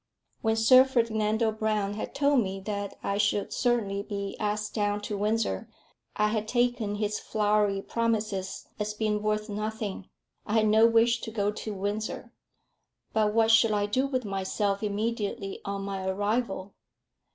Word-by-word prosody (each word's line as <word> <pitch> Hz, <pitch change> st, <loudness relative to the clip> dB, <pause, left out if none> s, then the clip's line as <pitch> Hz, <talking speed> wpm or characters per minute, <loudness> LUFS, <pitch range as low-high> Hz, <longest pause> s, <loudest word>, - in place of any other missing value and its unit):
When 220 Hz, -1 st, +2 dB
Sir 255 Hz, +4 st, +7 dB
Ferdinando 225 Hz, -3 st, +1 dB
Brown 215 Hz, -2 st, -1 dB
had 215 Hz, -, -6 dB
told 280 Hz, -2 st, +3 dB
me 195 Hz, -2 st, -3 dB
that 200 Hz, 0 st, -4 dB
I 200 Hz, +1 st, -1 dB
should 205 Hz, 0 st, +1 dB
certainly 220 Hz, -5 st, 0 dB
be 200 Hz, -1 st, -5 dB
asked 210 Hz, 0 st, -2 dB
down 205 Hz, -1 st, 0 dB
to 205 Hz, 0 st, -4 dB
Windsor, 210 Hz, -, -1 dB, 0.5 s
I 210 Hz, 0 st, +2 dB
had 215 Hz, 0 st, -1 dB
taken 240 Hz, -3 st, +1 dB
his 210 Hz, 0 st, -1 dB
flowery 210 Hz, -2 st, +1 dB
promises 215 Hz, -5 st, -2 dB
as 210 Hz, 0 st, -2 dB
being 210 Hz, -1 st, 0 dB
worth 215 Hz, 0 st, 0 dB
nothing. 215 Hz, -2 st, -4 dB, 0.3 s
I 210 Hz, -, -4 dB
had 215 Hz, -1 st, +4 dB
no 220 Hz, +2 st, +6 dB
wish 230 Hz, +1 st, +3 dB
to -, -, -5 dB
go 205 Hz, -2 st, 0 dB
to 215 Hz, 0 st, -6 dB
Windsor. 205 Hz, +3 st, -4 dB, 0.8 s
But 215 Hz, -1 st, +2 dB
what 225 Hz, 0 st, +4 dB
should 225 Hz, -1 st, +5 dB
I 205 Hz, -1 st, +1 dB
do 255 Hz, +7 st, +1 dB
with 255 Hz, -3 st, -2 dB
myself 195 Hz, +1 st, -1 dB
immediately 205 Hz, -2 st, -2 dB
on 200 Hz, 0 st, -3 dB
my 195 Hz, -1 st, -4 dB
arrival? 205 Hz, 0 st, -1 dB
210 Hz, 155 wpm, -28 LUFS, 205-225 Hz, 0.8 s, Sir